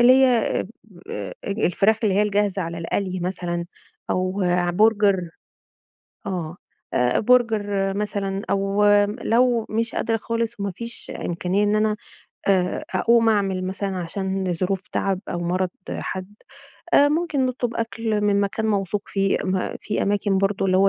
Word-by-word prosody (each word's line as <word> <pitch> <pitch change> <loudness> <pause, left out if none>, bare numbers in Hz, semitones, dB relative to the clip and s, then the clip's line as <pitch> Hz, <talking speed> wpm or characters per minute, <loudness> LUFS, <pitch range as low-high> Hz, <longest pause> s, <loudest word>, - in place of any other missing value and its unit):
اللي 240 +1 +8
هي 255 -4 +3
اب 185 - -6 0.4
أ 100 -2 -5
اج 200 +2 -3
الفراخ 205 +4 +3
اللي 200 -3 +2
هي 205 - +4
الجاهزة 205 -2 +1
على 170 0 -5
القلي 185 +2 -2
مثلًا، 175 -1 -2 0.5
أو 185 +2 0
ع 175 -1 +2
برجر 200 -2 +3 1.0
آه. 175 -4 -3 0.4
أ 125 0 +2
برجر 210 -5 +2
مثلًا 200 -1 -2
أو 195 +1 +1 0.2
م 205 +2 -5
لو 235 -1 +2
مش 225 +1 -1
قادرة 225 - 0
خالص 230 -1 -3
وما 200 0 -1
فيش 230 +5 -7 0.2
إمكانية 180 +4 0
إن 205 +1 +2
أنا 215 0 +2 0.5
آآ 185 -2 +1
أقوم 230 -1 +4
أعمل 195 -3 +1
مثلًا 190 0 -3
عشان 190 +1 -2
ظروف 185 +2 -2
تعب 195 -2 -1
أو - - -2
مرض 180 +2 0 0.2
حد، 190 +2 -5 0.6
أ 285 - +7
ممكن 300 -4 +1
نطلب 245 -2 -2
أكل 225 -2 -1
من 205 -1 +2
مكان 205 +2 -1
موثوق 200 -2 0
فيه. 195 -1 +1
ما 185 -1 -1
في 210 - -2
أماكن 200 -1 +1
برضه 195 0 +1
اللي 185 -1 +3
هو 195 +1 +5
200 Hz, 155 wpm, -23 LUFS, 185-220 Hz, 1.0 s, اللي